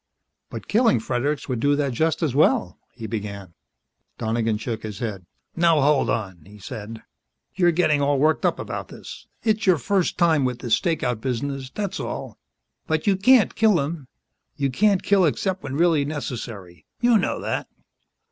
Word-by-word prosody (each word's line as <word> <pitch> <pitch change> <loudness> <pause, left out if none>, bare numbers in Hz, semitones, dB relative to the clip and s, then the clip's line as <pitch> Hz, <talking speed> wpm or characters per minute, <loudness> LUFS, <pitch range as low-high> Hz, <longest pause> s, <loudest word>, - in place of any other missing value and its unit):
"But - - -8
killing 225 - +3
Fredericks 135 +6 -2
would 125 -4 -2
do 145 +4 +2
that 140 -3 -1
just 160 +6 0
as 150 -6 0
well 110 -10 +2
" - - -44
he 115 - -6
began. 100 -4 -6 0.6
Donegan 115 -1 0
shook 110 0 -4
his 105 -2 -6
head. 100 -7 -5 0.3
"Now, 165 -2 +4
hold 145 0 +3
on," 95 -6 -3
he 105 +4 -15
said. 105 +2 -8 0.5
"You're 175 -2 +3
getting 155 -4 +2
all 140 0 +2
worked 155 +3 +2
up - - +2
about - - -5
this. - - -11 0.2
It's 215 -2 0
your 185 -3 +5
first 185 +7 0
time 160 -4 +3
with 125 -2 -1
this 120 -3 -2
stakeout 125 - 0
business, 135 +1 -3
that's 200 +6 -4
all. - - -6 0.5
But 160 -1 -1
you 200 - +3
can't 225 +4 +4
kill 215 -6 +3
him. 145 -1 -4 0.5
You 140 -3 -1
can't 200 +6 +2
kill 200 -2 +3
except 185 +4 0
when 135 -1 -5
really 165 -3 +3
necessary. 115 - -6
You 240 -2 +4
know - - -1
that." - - -3
140 Hz, 175 wpm, -23 LUFS, 115-170 Hz, 0.6 s, your